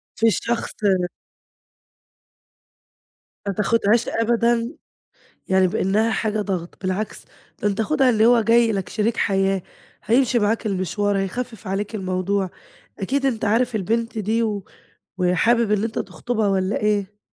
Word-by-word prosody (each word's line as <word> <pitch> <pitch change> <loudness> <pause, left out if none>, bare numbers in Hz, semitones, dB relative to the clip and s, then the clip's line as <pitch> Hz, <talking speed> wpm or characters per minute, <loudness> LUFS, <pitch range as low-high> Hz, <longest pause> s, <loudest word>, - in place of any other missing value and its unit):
في 230 - +3
الشخص 230 +1 0
آآ 185 -3 +2 2.4
ما 200 - 0
تاخدهاش 215 +2 +2
أبدًا 235 +1 +1 0.8
يعني 190 0 +4
بإنّها 210 +3 +1
حاجة 215 -1 -1
ضغط، 185 -4 -4
بالعكس، 190 +3 -3 0.4
ده 210 - +3
أنت 205 +2 0
خدها 265 +1 +3
اللي 220 -1 +4
هو 240 0 +6
جاي 230 +1 +4
لك 195 -3 -3
شريك 220 +2 0
حياة، 195 -1 +1 0.4
هيمشي 240 +2 +3
معاك 220 +1 0
المشوار، 205 +1 0
هيخفف 225 +3 -4
عليك 200 +3 -3
الموضوع. 185 0 -1 0.5
أكيد 270 +7 0
أنت 230 -5 -1
عارف 230 +3 +1
البنت 230 +4 -1
دي 220 +3 0
و 205 -4 -2 0.5
وحابب 210 +6 +2
إن 210 0 +2
أنت 225 -1 -3
تخطبها 225 -4 -2
والّا 190 +1 0
إيه؟ 205 -1 -1
210 Hz, 130 wpm, -22 LUFS, 195-230 Hz, 2.4 s, هو